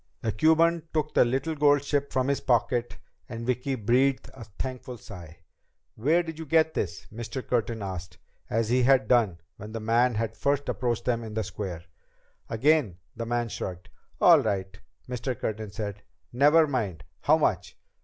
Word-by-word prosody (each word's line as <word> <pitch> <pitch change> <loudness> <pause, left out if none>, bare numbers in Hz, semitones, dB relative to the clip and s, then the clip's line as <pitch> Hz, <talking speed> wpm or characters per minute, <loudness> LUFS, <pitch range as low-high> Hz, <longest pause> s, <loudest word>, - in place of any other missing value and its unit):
The 110 - 0
Cuban 160 +8 +3
took 155 -1 0
the - - +6
little 135 +6 -1
gold 145 -2 +3
ship 145 -1 -1
from 130 0 0
his 140 - 0
pocket 120 -1 0 0.3
and 115 -1 -6
Vicki 125 +2 -1
breathed 130 +4 +1
a 120 -4 -10
thankful 125 +4 -6
sigh. 85 -8 -12 0.5
"Where 155 +10 +2
did 160 -1 -7
you 160 - -5
get 160 +1 +3
this?" 90 - -3
Mr. 120 +3 -6
Curtin 115 -3 -1
asked, 95 -2 -6 0.3
as 115 0 0
he 125 +2 +3
had 130 -3 +4
done 110 -9 +2 0.2
when 105 +2 -9
the 115 - -3
man 115 +2 +2
had 115 +1 -2
first 140 0 0
approached 120 -2 -1
them 120 -2 0
in 110 -1 -7
the 110 - 0
square. 90 -4 -6 0.7
Again 120 - +2 0.2
the 115 0 -5
man 120 0 0
shrugged. 90 -3 -6 0.3
"All - - +7
right," 95 -1 -2 0.3
Mr. 125 -1 -4
Curtin 110 -1 -3
said. 100 0 -5 0.3
"Never 150 +5 +5
mind. 110 - -3 0.2
How - - +4
much?" - - -1
120 Hz, 170 wpm, -27 LUFS, 110-140 Hz, 0.7 s, All